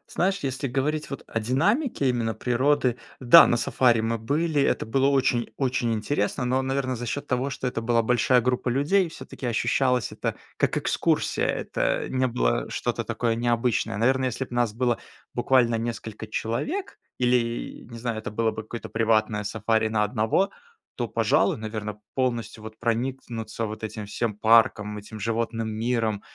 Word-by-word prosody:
Знаешь, 190 Hz, +2 st, +1 dB
если 135 Hz, +1 st, -2 dB
говорить 145 Hz, +4 st, -1 dB
вот 140 Hz, -, -6 dB
о 115 Hz, -, -2 dB
динамике 150 Hz, -, +1 dB
именно 115 Hz, -3 st, -1 dB
природы 130 Hz, 0 st, +1 dB, 0.2 s
Да, 135 Hz, +6 st, +9 dB
на 120 Hz, -, +2 dB
сафари 120 Hz, -1 st, +3 dB
мы 115 Hz, +1 st, -1 dB
были, 145 Hz, +5 st, 0 dB
это -, -, +1 dB
было 135 Hz, +4 st, +2 dB
очень 130 Hz, -4 st, +1 dB
очень 125 Hz, -3 st, 0 dB
интересно, 110 Hz, +2 st, -1 dB
но, 130 Hz, +2 st, +1 dB
наверно, 130 Hz, -1 st, -1 dB
за 120 Hz, +1 st, -5 dB
счёт 145 Hz, +5 st, -3 dB
того, 130 Hz, +1 st, -1 dB
что 135 Hz, -, -5 dB
это 120 Hz, -2 st, -2 dB
была 115 Hz, 0 st, +2 dB
большая 125 Hz, +2 st, +3 dB
группа 125 Hz, +1 st, 0 dB
людей, 150 Hz, +9 st, +2 dB
всё-таки 135 Hz, -4 st, -7 dB
ощущалось 125 Hz, +1 st, +1 dB
это -, -, -3 dB, 0.2 s
как -, -, +1 dB
экскурсия, -, -, +1 dB
это -, -, -1 dB
не 130 Hz, 0 st, +1 dB
было -, -, 0 dB
что-то -, -, -2 dB
такое 115 Hz, -2 st, -1 dB
необычное. 120 Hz, -2 st, 0 dB
Наверное, 130 Hz, +4 st, +2 dB
если 130 Hz, +2 st, -4 dB
б 125 Hz, -, -12 dB
нас 120 Hz, -3 st, +1 dB
было 120 Hz, -1 st, +1 dB, 0.4 s
буквально 120 Hz, -3 st, +3 dB
несколько 115 Hz, -2 st, -5 dB
человек 135 Hz, -, -3 dB, 0.2 s
или, 120 Hz, -2 st, 0 dB
не 115 Hz, -, -7 dB
знаю, 115 Hz, -1 st, -3 dB
это -, -, -5 dB
было 110 Hz, +1 st, +1 dB
бы -, -, -11 dB
какое-то 115 Hz, +2 st, -8 dB
приватное 110 Hz, -2 st, +1 dB
сафари 110 Hz, +1 st, 0 dB
на 110 Hz, -1 st, +1 dB
одного, 110 Hz, -, +1 dB, 0.4 s
то, -, -, -2 dB
пожалуй, 185 Hz, -, +2 dB
наверно, 110 Hz, -1 st, -5 dB
полностью 120 Hz, -4 st, -2 dB
вот 110 Hz, 0 st, -9 dB
проникнуться 115 Hz, -2 st, -2 dB
вот 110 Hz, 0 st, -7 dB
этим 110 Hz, 0 st, -5 dB
всем 105 Hz, +1 st, -2 dB
парком, 105 Hz, -1 st, +3 dB
этим 110 Hz, +1 st, -10 dB
животным 115 Hz, 0 st, -1 dB
миром 110 Hz, -2 st, -1 dB
120 Hz, 165 wpm, -25 LUFS, 110-130 Hz, 0.4 s, Да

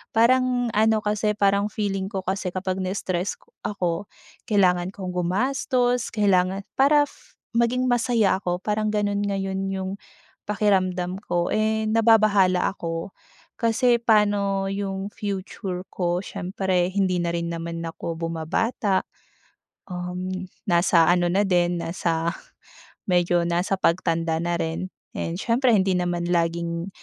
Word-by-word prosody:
Parang 245 Hz, +1 st, +3 dB
ano 220 Hz, +1 st, +3 dB
kasi, 210 Hz, 0 st, 0 dB
parang 200 Hz, 0 st, +3 dB
feeling 195 Hz, -2 st, -2 dB
ko 195 Hz, -3 st, -4 dB
kasi 190 Hz, 0 st, -2 dB
kapag 185 Hz, 0 st, -2 dB
na-stress 185 Hz, 0 st, -2 dB, 0.3 s
ako, 180 Hz, -1 st, -2 dB, 0.4 s
kailangan 180 Hz, -4 st, +3 dB
kong 190 Hz, -3 st, -5 dB
gumastos, 245 Hz, +6 st, +1 dB
kailangan 195 Hz, -2 st, +2 dB, 0.2 s
para 290 Hz, +2 st, +6 dB, 0.5 s
maging 245 Hz, +2 st, +2 dB
masaya 230 Hz, -5 st, +2 dB
ako 180 Hz, -2 st, -2 dB
parang 215 Hz, 0 st, 0 dB
ganun 205 Hz, -1 st, 0 dB
ngayon 195 Hz, -1 st, -2 dB
'yung 190 Hz, 0 st, -3 dB, 0.6 s
pakiramdam 190 Hz, -4 st, +1 dB
ko, 175 Hz, 0 st, 0 dB
eh, 220 Hz, 0 st, +1 dB
nababahala 215 Hz, -5 st, +4 dB
ako 165 Hz, -1 st, -5 dB, 0.5 s
kasi 235 Hz, +1 st, +3 dB
paano 205 Hz, -3 st, +2 dB
'yung 195 Hz, 0 st, -3 dB
future 190 Hz, -2 st, -4 dB
ko, 175 Hz, -1 st, 0 dB
siyempre, 185 Hz, -1 st, -1 dB
hindi 190 Hz, -2 st, +1 dB
na 170 Hz, 0 st, -1 dB
rin 170 Hz, 0 st, -2 dB
naman 165 Hz, 0 st, -5 dB
ako 165 Hz, 0 st, -5 dB
bumabata. 185 Hz, +5 st, 0 dB, 0.9 s
Um, 180 Hz, 0 st, -4 dB, 0.4 s
nasa 170 Hz, -2 st, +4 dB
ano 175 Hz, 0 st, +3 dB
na 195 Hz, +2 st, +3 dB
din 175 Hz, -2 st, +2 dB
nasa 165 Hz, -1 st, -1 dB, 0.8 s
medyo 175 Hz, -1 st, +3 dB
nasa 175 Hz, +3 st, 0 dB
pagtanda 165 Hz, -2 st, +1 dB
na 175 Hz, 0 st, 0 dB
rin, 165 Hz, +3 st, -3 dB, 0.3 s
and 165 Hz, +1 st, -3 dB
siyempre 240 Hz, +4 st, +2 dB
hindi 190 Hz, -1 st, +2 dB
naman 175 Hz, -1 st, -1 dB
laging 170 Hz, 0 st, -1 dB
190 Hz, 120 wpm, -24 LUFS, 175-210 Hz, 0.9 s, para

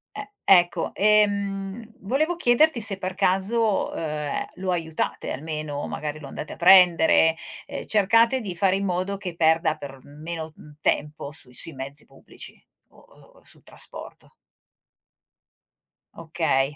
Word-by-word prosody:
E 410 Hz, -, -7 dB
ecco. 175 Hz, -2 st, +3 dB
Ehm, 205 Hz, +1 st, +1 dB
volevo 300 Hz, -, 0 dB
chiederti 250 Hz, -2 st, +3 dB
se 200 Hz, -2 st, -1 dB
per 185 Hz, 0 st, -4 dB
caso, 200 Hz, +4 st, +1 dB
ehm, 150 Hz, -2 st, -3 dB
lo 185 Hz, 0 st, -3 dB
aiutate 160 Hz, -2 st, -3 dB
almeno, 150 Hz, 0 st, -4 dB
magari 150 Hz, 0 st, -5 dB
lo 140 Hz, -, -9 dB
andate 150 Hz, -, -7 dB
a -, -, -10 dB
prendere, 175 Hz, -3 st, +6 dB, 0.3 s
ehm, -, -, -7 dB
cercate 230 Hz, +5 st, +3 dB
di 195 Hz, -7 st, -5 dB
fare 190 Hz, +1 st, +2 dB
in 195 Hz, 0 st, -1 dB
modo 185 Hz, +2 st, -2 dB
che 180 Hz, -4 st, -6 dB
perda 160 Hz, -1 st, +2 dB
per 140 Hz, -3 st, -10 dB
meno. 160 Hz, +2 st, -7 dB
mhmm, 150 Hz, -1 st, -15 dB
tempo 150 Hz, -1 st, -1 dB
sui 130 Hz, -5 st, -9 dB
sui 165 Hz, -, -4 dB
mezzi 140 Hz, +2 st, -6 dB
pubblici, 135 Hz, -, -12 dB, 0.3 s
o -, -, -24 dB
o -, -, -22 dB
sul -, -, -10 dB
trasporto? -, -, -9 dB, 1.8 s
Okay. 160 Hz, -4 st, -1 dB
175 Hz, 135 wpm, -24 LUFS, 155-200 Hz, 1.8 s, prendere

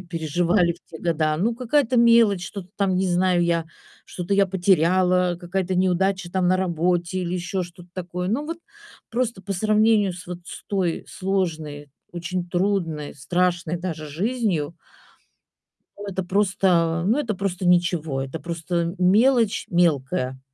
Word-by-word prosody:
переживали 170 Hz, +1 st, +1 dB
в 170 Hz, -, -22 dB
те 160 Hz, -, -9 dB
года. 155 Hz, -2 st, 0 dB
Ну, 225 Hz, +7 st, +1 dB
какая-то 255 Hz, +1 st, +1 dB
мелочь, 230 Hz, -6 st, +5 dB
что-то 190 Hz, -2 st, -8 dB
там, 195 Hz, -2 st, +1 dB
не 190 Hz, -, +1 dB
знаю, 180 Hz, 0 st, +2 dB
я 170 Hz, -1 st, +1 dB, 0.4 s
что-то 180 Hz, +2 st, -3 dB
я 195 Hz, 0 st, +4 dB
потеряла, 180 Hz, -1 st, +2 dB
какая-то 185 Hz, +1 st, -2 dB
неудача 185 Hz, 0 st, +1 dB
там 185 Hz, -2 st, +1 dB
на 185 Hz, -, +4 dB
работе 175 Hz, 0 st, 0 dB
или 180 Hz, 0 st, -2 dB
ещё 180 Hz, +1 st, -2 dB
что-то 175 Hz, 0 st, -11 dB
такое. 180 Hz, 0 st, -4 dB
Ну, 255 Hz, +9 st, -1 dB
вот 330 Hz, +2 st, -5 dB, 0.5 s
просто 235 Hz, -4 st, -1 dB
по 200 Hz, -, -3 dB
сравнению 215 Hz, 0 st, +3 dB
с 180 Hz, 0 st, -10 dB
вот 180 Hz, 0 st, -6 dB
с -, -, -9 dB
той 185 Hz, -5 st, -1 dB
сложной, 160 Hz, -7 st, -3 dB, 0.2 s
очень 175 Hz, +1 st, -4 dB
трудной, 175 Hz, -5 st, -1 dB
страшной 175 Hz, +3 st, 0 dB
даже 165 Hz, -3 st, -5 dB
жизнью 180 Hz, -, -1 dB, 1.3 s
это 190 Hz, -1 st, -3 dB
просто, 180 Hz, -4 st, +2 dB
ну, 230 Hz, +8 st, +3 dB
это 230 Hz, -8 st, -1 dB
просто 185 Hz, -1 st, -2 dB
ничего, 175 Hz, -6 st, +2 dB
это 135 Hz, +4 st, -6 dB
просто 170 Hz, 0 st, -2 dB
мелочь 220 Hz, +4 st, +3 dB
мелкая, 135 Hz, -6 st, +1 dB
180 Hz, 145 wpm, -23 LUFS, 170-195 Hz, 1.3 s, мелочь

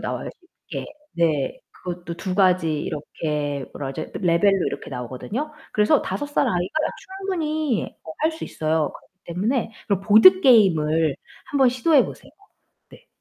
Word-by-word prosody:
나와요, -, -, -4 dB, 0.4 s
쉽게. -, -, -5 dB, 0.3 s
네. 155 Hz, -5 st, 0 dB
그것도 175 Hz, -1 st, -7 dB
2 180 Hz, +2 st, -4 dB
가지 185 Hz, -4 st, +3 dB
이렇게 145 Hz, -2 st, -3 dB
뭐라 135 Hz, -1 st, -5 dB
그러죠? 155 Hz, -, -6 dB
레벨로 185 Hz, +2 st, +3 dB
이렇게 -, -, -5 dB
나오거든요. 130 Hz, -, -5 dB, 0.2 s
그래서 215 Hz, +8 st, +3 dB
5 290 Hz, -, -3 dB
살 290 Hz, -, +1 dB
아이가 180 Hz, -, -1 dB, 0.5 s
충분히 310 Hz, -, -1 dB, 0.2 s
어 160 Hz, -, -8 dB
할 315 Hz, +1 st, +2 dB
수 320 Hz, -, -10 dB
있어요. 155 Hz, -1 st, -1 dB
그렇기 -, -, -17 dB
때문에 220 Hz, +8 st, -1 dB, 0.2 s
그런 200 Hz, -3 st, +1 dB
보드게임을 195 Hz, -, +5 dB, 0.4 s
한번 270 Hz, -3 st, +4 dB
시도해 260 Hz, +3 st, +3 dB
보세요. -, -, -10 dB, 0.6 s
네. -, -, -17 dB
185 Hz, 310 characters per minute, -23 LUFS, 160-265 Hz, 0.6 s, 보드게임을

